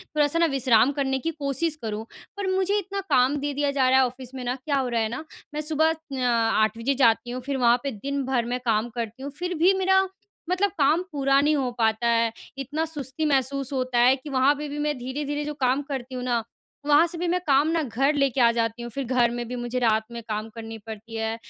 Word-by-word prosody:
थोड़ा-सा 295 +2 +2
ना 335 - +5
विश्राम 265 -3 +3
करने 265 -1 0
की 330 +5 -2
कोशिश 290 +3 0
करूँ। 220 -1 -4 0.3
पर 400 - -2
मुझे 385 +2 +1
इतना 395 0 -3
काम 255 +3 +4
दे 290 0 -2
दिया 285 0 0
जा 265 -2 +2
रहा 260 0 +5
है। 260 - +5
ऑफ़िस 255 +1 -7
में 255 - -5
ना 245 +1 -1
क्या 280 +2 -2
हो 265 -2 0
रहा 230 -1 0
है 220 - 0
ना, 260 +7 -5 0.3
मैं 300 - -2
सुबह 315 +1 +2
अ, - - -3 0.3
8 225 -2 +2
बजे 240 +5 0
जाती 240 -2 +3
हूँ 255 - -4
फिर 275 -1 -2
वहाँ 240 -1 +4
पे 275 - -2
दिन 275 +5 -3
भर 255 -3 0
मैं 245 +1 -2
काम 225 +1 +1
करती 235 +2 -5
हूँ 280 - -5
फिर 360 0 -2
भी 355 +5 +5
मेरा 380 0 +3 0.4
मतलब 385 +2 +2
काम 300 +5 +4
पूरा 275 -2 +2
नहीं 300 +1 +3
हो 265 -3 0
पाता 225 0 +1
है। 230 -1 +2 0.3
इतना 290 +4 -2
सुस्ती 295 -1 -4
महसूस 275 -1 0
होता 255 -2 -1
है 255 +2 +6
कि 275 +3 -10
वहाँ 270 +1 +4
पे 295 +1 -5
भी 290 - -5
मैं 295 -1 -1
धीरे-धीरे 290 +4 -3
जो 300 - -3
काम 260 +2 +2
करती 265 -2 -6
हूँ 250 - -4
ना, 240 -2 0 0.4
वहाँ 295 +3 +5
से 340 - -6
भी 345 +1 -2
मैं 360 +1 +1
काम 280 +1 +4
ना 330 0 +1
घर 270 +4 +1
लेके 275 -3 +1
आ 235 - +6
जाती 230 0 -1
हूँ 240 - -5
फिर 275 +3 -4
घर 245 -1 +2
में 240 0 -4
भी 250 - -5
मुझे 240 +1 -3
रात 220 -2 +2
में 235 0 -6
काम 215 +1 -3
करनी 225 0 -7
पड़ती 225 +1 -8
है। 225 0 -2
265 Hz, 245 wpm, -25 LUFS, 240-295 Hz, 0.4 s, है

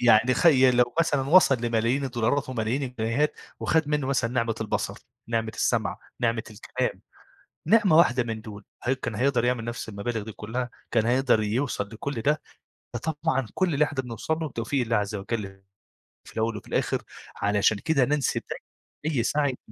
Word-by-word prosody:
يعني 120 +1 +5
خيّ 135 -6 +6
لو 125 -1 +2
مثلًا 145 -4 +2
وصَل 175 -6 +7
لملايين 120 +3 +1
الدولارات 130 +2 0
وملايين 125 +2 -1
الجنيهات، 125 +3 0 0.3
وخَد 160 -2 +2
منّه 150 -2 0
مثلًا 130 -4 +1
نِعمة 115 -2 0
البصر، 110 - -2 0.3
نِعمة 115 -1 -1
السمع، - - 0 0.2
نِعمة 115 -1 +1
الكلام، 105 - -3 0.7
نِعمة 200 -6 +5
واحدة 125 -7 +5
من 115 -2 -4
دُول، 105 -2 -10 0.2
هل 125 - +2
كان 130 -4 -4
هيقدَر 125 0 +2
يعمل 125 -2 +1
نَفْس 120 -1 -5
المبالغ 110 +2 -3
دي 110 - -7
كلّها؟ 120 +4 -4 0.2
كان 110 -2 +2
هيقدَر 125 -2 +3
يوصَل 105 -1 -1
لكلّ 120 +2 -4
ده؟ 150 +6 +1 0.5
فطبعًا 135 -1 -1
كلّ 185 -5 +1
اللي 150 - +4
إحنا 145 -3 -3
بنوصَل 125 +5 -2
له 160 -1 -2
بتوفيق 120 +2 -2
الله 115 -1 +1
عزّ 105 0 -1
وجَل، 100 -1 -4 0.6
في - - -14
الأول 110 0 -1
وفي 105 - -11
الآخر - - 0 0.3
علشان 105 +1 +2
كده 140 +2 +2
ننسب 145 0 0
دايمًا 155 -1 -6
أي 115 - +2
سَعي 145 0 +1
120 Hz, 165 wpm, -26 LUFS, 110-140 Hz, 0.7 s, وصَل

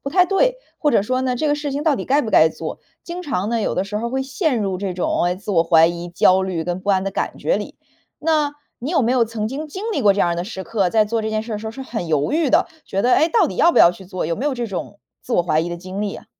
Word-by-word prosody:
不 275 - -3
太 360 +4 +4
对。 - - +2 0.2
或 295 - +2
者 225 - +3
说 255 +5 -1
呢， 255 -1 -1
这 305 - -1
个 290 - +2
事 295 0 -4
情 290 +2 -2
到 310 -2 +3
底 - - -5
该 285 +3 +3
不 220 - -4
该 160 -4 +6
做。 - - -6 0.3
经 350 +1 -6
常 240 - -2
呢， 235 -1 0
有 - - -1
的 - - 0
时 210 +1 -4
候 235 - -3
儿 - - -4
会 265 +1 -1
陷 265 - -1
入 190 -2 -2
这 190 -2 -3
种， 175 -1 0
哎， 175 +1 +1
自 200 +3 -7
我 170 -4 +4
怀 165 -1 +5
疑、 170 +1 -4
焦 185 +2 +4
虑 185 -4 -2
跟 175 +2 -3
不 200 - -8
安 190 -1 +2
的 195 - -2
感 - - -3
觉 - - 0
里。 - - -7 0.4
那 300 -2 +1 0.2
你 260 +6 -4
有 340 - +2
没 235 +1 +2
有 250 -2 +3
曾 220 -1 -3
经 285 +7 -5
经 380 +7 -7
历 285 - -1
过 205 -4 +4
这 200 - 0
样 175 - +3
儿 - - 0
的 175 - -2
时 190 -1 -7
刻， 200 -5 0
在 215 +3 +3
做 225 +2 -1
这 220 - -2
件 215 0 -1
事 230 - -7
儿 - - -1
的 - - -5
时 220 - -7
候 - - -3
是 265 +4 -8
很 230 -8 -5
犹 150 - 0
豫 315 -1 +2
的， 325 +7 +3 0.2
觉 195 - -1
得， 250 - +3
哎， 320 - +4
到 370 +1 +3
底 - - -6
要 340 - +5
不 - - +3
要 170 - +8
去 190 +1 -13
做， 185 0 -4
有 165 +1 -1
没 270 - -2
有 290 - 0
这 240 -1 -3
种 200 0 -6 0.2
自 245 - -3
我 175 - +3
怀 155 -2 +1
疑 170 - -3
的 175 - -4
经 185 +3 -7
历 205 -1 -2
呀？ - - -10
220 Hz, 355 characters per minute, -20 LUFS, 185-285 Hz, 0.4 s, 要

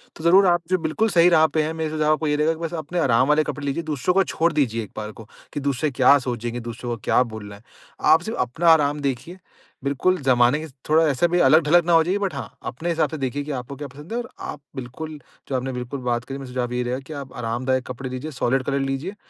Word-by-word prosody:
तो 155 - -10
ज़रूर, 190 +3 +6
आप 175 0 +3
जो 185 - +3
बिल्कुल 175 +7 0
सही 175 -1 +5
राह 160 -2 +5
पे 155 - 0
हैं 160 +1 -2
मेरा 160 -1 -3
सुझाव 155 0 +2
आपको 155 0 -1
यही 150 - +2
रहेगा 155 +2 +2
कि 160 - -11
बस 170 0 -4
अपने 165 +2 -3
आराम 125 -3 +3
वाले 155 +1 +4
कपड़े 145 -1 -5
लीजिए, 140 +4 -2
दूसरों 155 +3 -1
को 195 - +5
छोड़ 170 -1 0
दीजिए 115 -6 0
एक 100 - -12
बार 105 0 -4
को, 110 -1 -13 0.3
कि - - -2
दूसरे 140 +1 0
क्या 130 +2 +6
सोचेंगे, 120 -1 -4
दूसरे 120 +1 -6
को 120 - -2
क्या - - +3
बोलना 100 -2 -8
है, 100 - -17 0.5
आप 160 - +4
सिर्फ़ 220 +5 -5
अपना 160 +8 +1
आराम 150 -2 +3
देखिए। 140 +6 -3 0.5
बिल्कुल, 145 +7 +1
ज़माने 125 +2 +3
के 160 - -6 0.2
थोड़ा 160 +1 +5
ऐसा 145 +4 +2
भी 175 +1 +1
अलग-ढलग 160 +3 +5
ना 175 - +2
हो 165 - +6
जाइए, 185 +5 0
बट 200 -2 -1
हाँ, - - -7
अपने 170 +2 -5
हिसाब 160 -4 +1
से 155 - -5
देखिए 135 +1 -2
कि 150 - -6
आपको 130 +3 -9
क्या 145 +1 -6
पसंद 145 - -11
है 235 - -1
और 240 - -6 0.2
आप 145 - -10
बिल्कुल, 145 +5 -7 0.3
जो 135 - -1
आपने 130 +1 -2
बिल्कुल 125 +2 -5
बात 120 +1 -1
करी। 135 0 -6
मेरा 135 -2 -8
सुझाव 125 -1 -2
यही 125 0 0
रहेगा 125 +2 -2
कि 160 - -7
आप 130 -1 -16
आरामदायक 130 +3 -1
कपड़े 125 +1 -6
लीजिए, 130 +5 -5
सॉलिड 130 +2 +2
कलर 140 +1 -1
लीजिए, 160 +10 -4
145 Hz, 260 wpm, -23 LUFS, 125-160 Hz, 0.5 s, ज़रूर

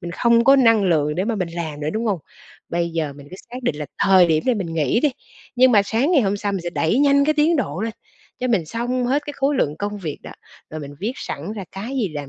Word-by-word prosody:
mình 170 - -6
không 235 +5 +3
có 275 +1 +7
năng 230 -5 +5
lượng 150 -4 +1
để 185 +4 -1
mà 230 0 -1
mình 180 -4 -2
làm 160 -3 -5
nữa, 150 - -2
đúng 225 +2 -2
hông? 200 -5 0 0.5
Bây 170 0 -1
giờ 160 -3 -2
mình 140 0 -13
cứ 185 - -9
xác 250 +1 -7
định 150 - -1
là 150 -1 -5
thời 190 -2 +5
điểm 160 -1 +1
này 250 - +3
mình 170 -6 -4
nghỉ 155 - +1
đi, 295 - +2 0.5
nhưng 255 0 +5
mà 205 -2 +6
sáng 230 - 0
ngày 280 -7 +4
hôm 200 0 0
sau 205 0 -2
mình 195 - -2
sẽ 175 0 -4
đẩy 170 +8 +1
nhanh 280 0 +4
cái 310 +1 +2
tiến 310 +2 +3
độ 230 -8 -2
lên, 225 0 -2 0.5
cho 255 - -2
mình 190 -9 +1
xong 245 +6 -2
hết 285 +3 +1
cái 290 - -4
khối 275 +1 +1
lượng 150 -8 0
công 205 +3 -4
việc 160 -6 -5
đó, - - -9 0.4
rồi 155 0 -6
mình 145 0 -9
viết 220 +6 -2
sẵn 165 +9 -6
ra 205 -3 -6
cái 195 +4 -6
gì 215 -7 0
làm 145 -3 -6
200 Hz, 280 wpm, -21 LUFS, 165-245 Hz, 0.5 s, có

